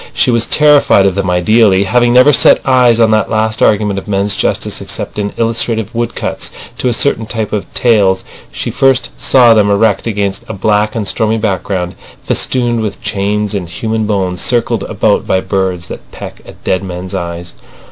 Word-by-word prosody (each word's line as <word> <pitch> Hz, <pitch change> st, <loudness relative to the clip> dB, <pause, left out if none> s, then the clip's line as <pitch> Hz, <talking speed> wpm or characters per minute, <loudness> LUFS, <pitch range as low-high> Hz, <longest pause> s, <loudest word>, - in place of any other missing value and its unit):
She -, -, +2 dB
was 115 Hz, -1 st, +1 dB
terrified 150 Hz, -9 st, +4 dB
of 95 Hz, -, +2 dB
them 100 Hz, 0 st, -2 dB
ideally. 95 Hz, +2 st, +3 dB
Having 120 Hz, +4 st, +2 dB
never 130 Hz, +4 st, +6 dB
set -, -, +5 dB
eyes 125 Hz, -3 st, +4 dB
on 115 Hz, -1 st, +4 dB
that 110 Hz, -2 st, +1 dB
last 110 Hz, 0 st, -1 dB
argument 105 Hz, -2 st, +2 dB
of 95 Hz, -, -14 dB
men's 100 Hz, 0 st, -1 dB
justice -, -, -2 dB
except -, -, -5 dB
in 100 Hz, 0 st, -2 dB
illustrative 115 Hz, -1 st, -1 dB
woodcuts 120 Hz, 0 st, -3 dB, 0.3 s
to -, -, -1 dB
a -, -, +2 dB
certain 115 Hz, -2 st, 0 dB
type 110 Hz, -2 st, -4 dB
of 105 Hz, -, -4 dB
tales, 100 Hz, -6 st, +2 dB, 0.3 s
she -, -, -5 dB
first 135 Hz, -1 st, +1 dB
saw 120 Hz, -3 st, +4 dB
them 105 Hz, -2 st, +3 dB
erect 100 Hz, +1 st, +1 dB
against 100 Hz, -3 st, -2 dB
a -, -, -6 dB
black 105 Hz, +2 st, 0 dB
and 110 Hz, -3 st, -3 dB
stormy 110 Hz, +1 st, 0 dB
background, 95 Hz, -4 st, -2 dB, 0.3 s
festooned 120 Hz, -3 st, -1 dB
with 105 Hz, -2 st, -4 dB
chains 105 Hz, +1 st, -2 dB
and 95 Hz, -4 st, -4 dB
human 110 Hz, +3 st, -3 dB
bones, 95 Hz, -4 st, -2 dB
circled 120 Hz, -2 st, 0 dB
about -, -, 0 dB
by 95 Hz, -, +1 dB
birds 95 Hz, -2 st, -2 dB
that -, -, -10 dB
peck -, -, -10 dB
at -, -, -15 dB
dead 95 Hz, +1 st, -1 dB
men's 90 Hz, -1 st, -7 dB
eyes. 85 Hz, 0 st, -5 dB
105 Hz, 180 wpm, -13 LUFS, 95-115 Hz, 0.3 s, never